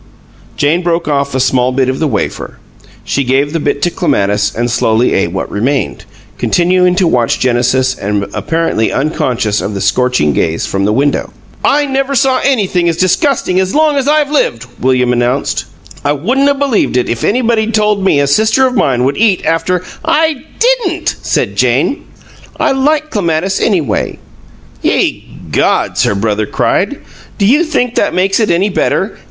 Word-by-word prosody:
Jane 155 +5 +1
broke 170 -2 -1
off 140 -2 -1
a - - +1
small 125 -1 +1
bit 130 0 0
of 130 0 -2
the 160 - +1
wafer. - - -3 0.5
She 140 - -1
gave 135 +3 0
the 165 - 0
bit 145 -1 -2
to 175 - +1
Clematis 105 - 0
and 120 +1 -1
slowly 115 +1 +1
ate 95 - +1
what 95 - -4
remained, 110 - -2 0.3
continuing 180 +1 +2
to 190 0 +2
watch 120 -7 +1
Genesis 130 +1 +1
and 100 0 -1
apparently 165 -9 -1
unconscious 125 -7 -1
of 105 - -4
the - - -3
scorching 125 - +1
gaze 80 +4 -1
from 100 0 -1
the 105 - +1
window. 140 +4 0 0.3
"I 290 +1 +2
never 275 0 -1
saw 260 0 +2
anything 190 -10 +1
as 165 - -2
disgusting 185 - +1
as 190 +4 -1
long 305 -1 +3
as 275 -1 0
I've 295 -1 +2
lived!" 125 - 0
William 125 -1 +1
announced. 125 +3 -1 0.4
"I 145 - +1
wouldn't 255 - +1
'a' 285 - +2
believed 270 - 0
it 125 - 0
if 115 0 -3
anybody'd 225 -1 +1
told 210 -2 +1
me 170 -7 +3
a 140 - +2
sister 220 - +3
of 255 - 0
mine 135 - +1
would 135 +2 0
eat 210 -4 +2
after 170 +2 0
" - - -24
"I 320 -1 +1 0.2
didn't," 450 -9 0
said - - -1
Jane. - - 0 0.5
"I - - +2
like 300 +3 0
Clematis, 185 -1 -1
anyway." 160 - 0 0.6
"Ye - - -1 0.2
gods!" - - +1
her 100 - 0
brother 105 +1 -1
cried. - - 0 0.4
"Do 200 - +1
you 285 +11 +4
think 250 -7 -1
that - - 0
makes 195 +3 +1
it 220 - +1
any 180 +4 +2
better? - - -1
165 Hz, 175 wpm, -13 LUFS, -, 0.6 s, you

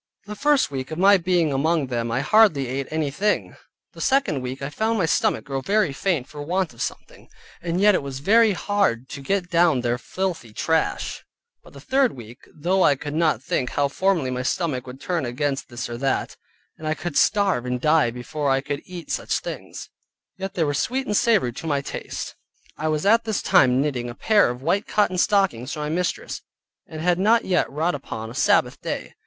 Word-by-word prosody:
The 210 +1 -7
first 290 - +2
week 130 -2 -4
of 155 - -5
my 195 +2 +6
being 170 -4 +1
among 155 +2 +1
them 120 -2 -2
I 120 +3 0
hardly 200 -6 +4
ate 135 +2 -3
any 155 -2 -1
thing; 205 +8 -1 0.4
the - - -10
second 265 - +1
week 125 +1 -5
I 140 - -4
found 220 +7 0
my 185 - +2
stomach - - +1
grow 135 -1 -3
very 200 0 +1
faint 150 -3 -1
for 150 - -9
want 175 +1 -1
of 115 - -11
something; - - -6 0.3
and 170 +1 -2
yet 210 +1 +6
it - - +1
was 140 -2 -6
very 215 +8 +4
hard 190 - 0
to 140 - -7
get 180 +4 -1
down 170 -6 +3
their 120 0 -1
filthy 175 - -4
trash; 160 +7 -1 0.4
but - - -17
the - - -11
third 265 -2 +1
week, 120 0 -11
though 180 +5 0
I 145 - +5
could 145 +2 -6 0.3
think 125 -3 -1
how 140 -1 0
formerly 170 -4 0
my 125 0 -2
stomach 130 -1 -2
would 125 +1 -9
turn 175 -1 -2
against 135 +3 -2
this 120 -1 -5
or 120 0 -6
that, 135 0 -1 0.4
and 155 - -6
I 155 - 0
could 175 -1 -5
starve 195 - +2
and 125 0 -1
die 155 -1 +3
before 140 +5 -3
I 135 0 +3
could 140 +1 -4
eat 175 -4 -8
such - - -1
things, - - -7 0.4
yet 190 0 -6
they 170 - +1
were 145 -2 0
sweet 260 - -1
and 210 - -1
savory 205 - +3
to 165 - -7
my 145 -2 +1
taste. - - -6 0.4
I 155 - -3
was 155 +1 -1
at 225 +3 +5
this 220 -3 -2
time 125 0 +4
knitting 130 -4 -1
a 120 - -8
pair 210 - +3
of 125 +2 -6
white 190 +7 0
cotton 185 -4 +1
stockings 180 - +1
for - - -6
my 150 - -2
mistress; 175 +3 -2 0.5
and 160 -4 -7
had 175 +1 +2
not 225 +4 +3
yet 185 - +1
wrought 160 +5 0
upon 115 -5 -6
a - - -9
Sabbath - - +2
day. - - -5
155 Hz, 210 wpm, -23 LUFS, 135-190 Hz, 0.5 s, my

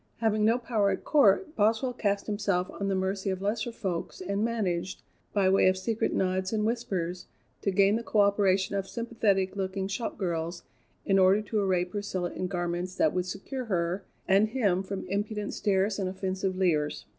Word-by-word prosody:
Having 215 -2 +1
no 230 +2 +4
power 225 -5 +1
at 190 - -2
court, 295 - +3
Boswell 225 +4 +2
cast 200 -4 -1
himself 200 -4 -1
on 200 - -4
the 195 - +1
mercy 190 +1 -1
of 190 -1 -2
lesser 210 +4 -1
folks 185 -6 -4
and 200 +3 -2
managed, 190 -6 -2 0.3
by 200 -2 +2
way 190 0 +5
of 185 0 +3
secret 215 +4 -1
nods 185 0 0
and 215 -1 0
whispers, 190 -7 -2 0.3
to - - 0
gain 200 +2 +4
the 235 - -5
coöperation 200 -3 +2
of 195 -1 -2
sympathetic 205 -5 0
looking 190 0 -2
shop 200 +4 -3
girls 170 -2 -3 0.4
in 195 -1 +3
order 190 +3 +5
to 215 0 -1
array 185 -3 +1
Priscilla 185 -2 -3
in 185 - -3
garments 175 0 -3
that 155 - +2
would 180 0 -1
secure 250 +8 -5
her 180 -2 -1 0.2
and 195 +3 +4
him 205 -7 +1
from 195 0 -5
impudent 205 +2 -2
stares 195 +1 +1
and 190 -2 -1
offensive 190 0 -2
leers. 155 -6 0
195 Hz, 180 wpm, -28 LUFS, 185-210 Hz, 0.4 s, way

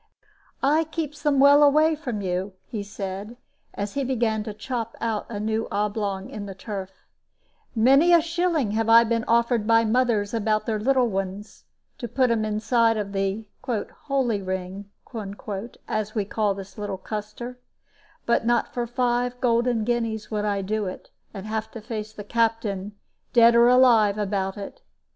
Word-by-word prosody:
"I 300 +4 +4
keeps 305 -2 -5
them 290 -2 +2
well 285 +1 +7
away 305 +2 +5
from 245 -9 -4
you," 185 +1 -2
he 215 - -5
said, 200 +2 -6 0.4
as 200 0 -4
he 280 - -1
began 230 -4 0
to 215 - -4
chop 230 0 -4
out 225 -2 -2
a 210 -3 -4
new 220 +1 -1
oblong 205 -2 -2
in 205 -2 -7
the 195 - -7
turf; 195 -1 -6 0.9
"many 270 +9 +5
a 340 - +8
shilling 335 - 0
have 225 +1 0
I 230 +1 +8
been 230 0 0
offered 235 -1 +2
by 230 0 +5
mothers 225 -3 +1
about 215 -1 0
their 220 -2 -1
little 255 +2 +3
ones, 195 0 -5 0.3
to 240 - -4
put 250 +1 +1
'em 225 -2 +1
inside 225 +2 +2
of 205 -2 -3
the 195 +2 -1 0.2
'holy 245 0 -1
ring,' 190 +1 -5 1.0
as 215 0 -2
we 210 -2 0
calls 205 -1 0
this 195 +2 -9
little 205 -2 -3
cluster; 215 +5 -6 0.7
but 235 - +2
not 240 +1 +1
for 240 -1 -2
five 245 0 0
golden 240 -2 +2
guineas 225 -2 -2
would 210 -1 -1
I 200 -1 0
do 210 +1 -1
it, 185 - -8 0.2
and 195 -1 -8
have 220 0 -3
to 230 - -6
face 215 -1 -6
the 210 -1 -9
Captain, 215 -3 -1 0.4
dead 235 -1 +7
or 235 0 +6
alive, 235 -5 +5
about 195 -2 -2
it. 205 - -8
220 Hz, 165 wpm, -24 LUFS, 205-245 Hz, 1.0 s, a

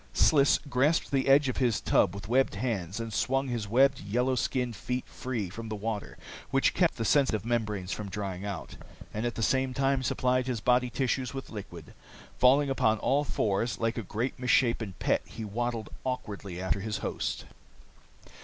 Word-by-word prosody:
Sliss 140 -3 +5
grasped 140 +5 +2
the 135 -1 +1
edge 140 +1 +6
of 130 - -2
his 120 -5 +2
tub 90 - +2
with 100 -2 -7
webbed 130 0 +2
hands 100 -4 -2
and 115 -1 -5
swung 135 +4 0
his 115 -4 -2
webbed, 135 +5 +4
yellow 125 +6 0
skinned 125 -1 -1
feet 125 +4 -3
free 120 -6 -4
from 110 +5 -7
the 110 - -3
water 105 0 -4 0.3
which - - +2
kept - - +2
the 115 - -2
sensitive 115 -6 +2
membranes 105 -6 -1
from 105 -2 -4
drying, 95 -1 -4
and 105 +2 -6
at 120 - -4
the 115 - -2
same 130 +2 +1
time 135 -1 +2
supplied 130 0 +1
his 125 -3 -1
body 125 +2 +2
tissues 130 +1 -1
with 135 - -6
liquid. 85 -7 -9 0.5
Falling 135 +2 +5
upon 110 -4 +2
all 140 +6 +1
fours, 115 -4 0
like 115 0 0
a 115 - -2
great, 115 +6 -3
misshapen 115 -5 +2
pet, - - +1
he 110 - -7
waddled 115 +1 -3
awkwardly 100 -8 -4
after 95 +2 0
his 105 +2 -3
host. - - -3
120 Hz, 175 wpm, -29 LUFS, 105-130 Hz, 0.5 s, edge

